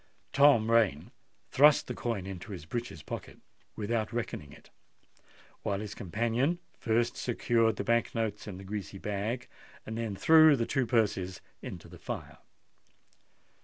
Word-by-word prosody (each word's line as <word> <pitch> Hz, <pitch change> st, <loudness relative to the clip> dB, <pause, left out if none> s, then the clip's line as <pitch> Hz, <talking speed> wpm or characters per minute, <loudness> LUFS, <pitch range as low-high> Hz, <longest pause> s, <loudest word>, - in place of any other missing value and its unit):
Tom 140 Hz, -6 st, +5 dB
Rain 105 Hz, -11 st, +2 dB, 0.4 s
thrust 145 Hz, +2 st, +6 dB
the 125 Hz, -, -4 dB
coin 115 Hz, -5 st, -3 dB
into 95 Hz, +2 st, -7 dB
his 85 Hz, -5 st, -8 dB
breeches' 115 Hz, -5 st, -5 dB
pocket -, -, -7 dB, 0.4 s
without 110 Hz, +1 st, -1 dB
reckoning 115 Hz, -11 st, -4 dB
it; -, -, -16 dB, 0.9 s
while 100 Hz, -1 st, -1 dB
his 105 Hz, -1 st, -5 dB
companion 115 Hz, -, 0 dB, 0.2 s
first 115 Hz, +1 st, +1 dB
secured 115 Hz, -2 st, +1 dB
the -, -, -3 dB
Bank 115 Hz, 0 st, +1 dB
notes 110 Hz, -2 st, -2 dB
in 95 Hz, -3 st, -6 dB
the 95 Hz, -, -9 dB
greasy 100 Hz, -2 st, -5 dB
bag, 105 Hz, +5 st, -3 dB, 0.4 s
and 110 Hz, +1 st, -5 dB
then 110 Hz, -4 st, -2 dB
threw 155 Hz, +5 st, +7 dB
the 115 Hz, -3 st, 0 dB
two 135 Hz, -2 st, 0 dB
purses 100 Hz, -5 st, +1 dB, 0.2 s
into -, -, -8 dB
the -, -, -13 dB
fire. -, -, -6 dB
110 Hz, 145 wpm, -30 LUFS, 100-120 Hz, 0.9 s, threw